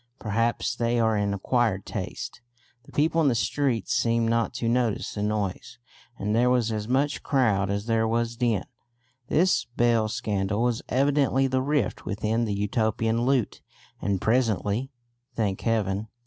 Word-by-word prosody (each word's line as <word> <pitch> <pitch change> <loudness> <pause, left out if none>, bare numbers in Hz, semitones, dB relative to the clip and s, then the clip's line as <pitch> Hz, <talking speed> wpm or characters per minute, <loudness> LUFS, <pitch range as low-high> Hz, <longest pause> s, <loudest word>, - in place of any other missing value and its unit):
Perhaps 115 +2 -1
they 120 0 +1
are 110 -1 +2
an 100 -1 0
acquired 100 0 0
taste; 120 - -6 0.4
the - - -16
people 160 +3 +2
in 155 - +3
the 125 - +3
streets 120 -1 0
seemed 115 0 +2
not 115 -1 +1
to 115 - -2
notice 120 -2 0
the 105 - -4
noise, 105 - -2 0.4
and 105 +2 -1
there 120 +2 +4
was 120 -3 +2
as 105 -1 -3
much 140 +4 +1
crowd 110 -9 +1
as 100 +1 -2
there 115 -1 +1
was 115 +1 0
din. 115 -5 0 0.6
This 180 +6 +2
bell 115 -2 +3
scandal 105 -1 -1
was 120 -2 0
evidently 135 0 +2
the 130 0 +1
rift 140 -5 -1
within 110 +3 -1
the 105 -2 -2
Utopian 110 +3 0
lute; 130 -5 0 0.4
and 100 -2 0
presently, 115 +1 +1 0.5
thank 100 -4 -1
heaven! 105 -2 0
115 Hz, 155 wpm, -26 LUFS, 105-125 Hz, 0.6 s, there